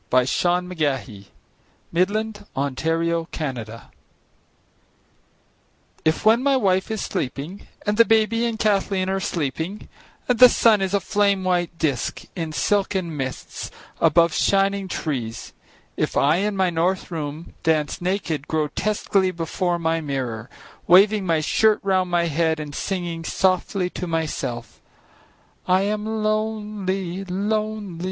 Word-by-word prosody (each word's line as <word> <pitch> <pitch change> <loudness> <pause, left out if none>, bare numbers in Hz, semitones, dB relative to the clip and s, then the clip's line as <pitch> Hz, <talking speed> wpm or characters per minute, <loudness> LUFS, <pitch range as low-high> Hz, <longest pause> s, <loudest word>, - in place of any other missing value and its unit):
William 125 0 +4
Carlos 155 - -1 0.7
Williams 205 +4 0
Danse 135 -1 -2
Russe 160 -8 -2 2.2
IF 160 +5 +1
when 225 +3 +5
my 275 0 +3
wife 190 -4 +1
is 220 -2 -2
sleeping 145 +9 -4 0.2
and 210 0 0
the 230 - +8
baby 225 +1 +2
and 230 -1 -3
Kathleen 195 -3 +1
are 195 0 0
sleeping 165 +3 -3 0.4
and 250 -2 +1
the 250 0 +10
sun 220 -4 +4
is 195 +1 0
a - - +3
flame 200 -1 +1
white 175 -2 0
disc 140 -8 -1
in 165 -4 -3
silken 190 -1 0
mists 130 -2 -5 0.3
above 165 +1 +4
shining 195 0 +2
trees, 130 -10 -4 0.4
if - - -1
I 150 +4 +4
in 205 +2 0
my 185 -2 +2
north 175 +3 0
room 155 0 -5
dance 155 -1 0
naked, 175 -5 -2
grotesquely 185 +5 0
before 175 0 -1
my 165 -1 0
mirror 125 -6 -4 0.4
waving 195 +2 +5
my 165 -2 +2
shirt 215 +7 +3
round 185 -2 +1
my 175 -1 +2
head 160 0 +1
and 150 -1 -6
singing 175 -1 -3
softly 185 +1 0
to 180 - -5
myself: 150 -8 -3 0.9
"I 185 +1 +3
am 215 +1 -2
lonely, 210 -4 -2
lonely. 205 -1 -2
180 Hz, 125 wpm, -23 LUFS, 160-205 Hz, 2.2 s, the